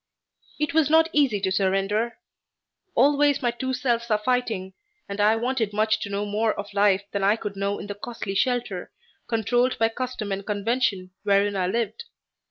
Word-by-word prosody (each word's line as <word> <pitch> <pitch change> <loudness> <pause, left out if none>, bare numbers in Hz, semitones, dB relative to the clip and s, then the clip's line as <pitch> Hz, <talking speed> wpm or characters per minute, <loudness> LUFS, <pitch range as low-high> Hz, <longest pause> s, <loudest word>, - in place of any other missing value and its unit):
It 300 +2 -1
was 315 -2 +3
not 320 +1 +5
easy 270 -8 +3
to 190 -1 0
surrender. 195 +4 0 0.8
Always 285 +1 +3
my 240 - +2
two 260 +2 -3
selves 240 -2 -1
are 215 - +3
fighting 215 -5 -1 0.3
and 200 +1 -3
I 215 +2 +5
wanted 230 -2 -1
much 215 +1 +2
to 210 - -5
know 200 +1 -2
more 215 +2 0
of 205 0 -6
life 200 -1 +3
than 200 -1 -2
I 200 +2 +4
could 210 -3 -6
know 200 +1 -1
in - - -7
the 205 - -5
costly 205 -1 -6
shelter, 240 -4 -1 0.4
controlled 245 +2 +1
by 225 0 +3
custom 245 -3 -4
and 195 +1 -2
convention, 205 -2 -1
wherein 200 0 +2
I 185 -2 0
lived. 230 - -2
215 Hz, 180 wpm, -25 LUFS, 200-245 Hz, 0.8 s, not